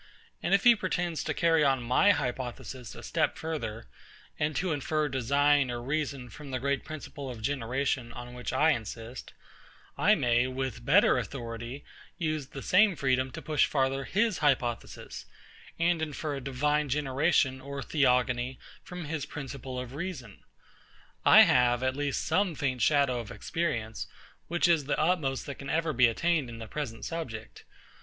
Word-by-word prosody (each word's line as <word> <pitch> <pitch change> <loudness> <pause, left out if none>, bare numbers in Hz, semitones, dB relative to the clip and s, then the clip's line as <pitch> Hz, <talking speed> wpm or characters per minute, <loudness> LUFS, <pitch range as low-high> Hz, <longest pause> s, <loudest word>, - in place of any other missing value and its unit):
And 195 - +3
if 200 - +1
he 240 -1 +8
pretends 175 -5 -2
to - - -1
carry 165 -2 +3
on 135 -3 +2
my 125 +12 +4
hypothesis 125 - -2
a - - -10
step - - 0
further, 115 -9 -4 0.5
and 150 0 0
to 185 -1 0
infer 150 +1 0
design 140 +2 +2
or 120 -1 -3
reason 140 0 -2
from 150 -2 -10
the 130 - -2
great 140 +1 -1
principle 145 -3 -7
of 120 -3 -7
generation, 130 0 -1
on 120 0 -8
which 125 0 -5
I 160 +1 +4
insist; 115 -1 -5 0.7
I - - +5
may, 120 +1 +2
with 130 -1 -4
better - - +5
authority, 120 +1 -6 0.3
use 155 -4 -2
the 135 - -8
same 200 0 +4
freedom 130 -2 +1
to - - -9
push 155 -2 +2
further 135 -1 0
his 215 -2 +1
hypothesis, 130 -5 -1 0.5
and 170 0 +2
infer 150 -1 -3
a - - -6
divine 145 +3 0
generation 135 -1 +1
or 140 0 -6
theogony 125 -3 +1 0.3
from 180 -2 -7
his 150 -1 -4
principle 135 -2 -6
of 125 0 -7
reason. 145 - -6 0.8
I - - +9
have 125 -1 +4
at 130 0 +1
least 145 -1 -1
some 185 -4 +1
faint 130 -3 -1
shadow 140 -1 +3
of 115 -3 -7
experience, 120 -10 -3 0.4
which 175 +1 +2
is 165 -5 +3
the 145 - 0
utmost 155 -5 +1
that 140 - -7
can 140 - -7
ever 160 -1 0
be 125 -1 +5
attained 155 +3 0
in 115 - -8
the 115 - -7
present 120 -4 -5
subject. 115 - -6
135 Hz, 165 wpm, -29 LUFS, 125-155 Hz, 0.8 s, I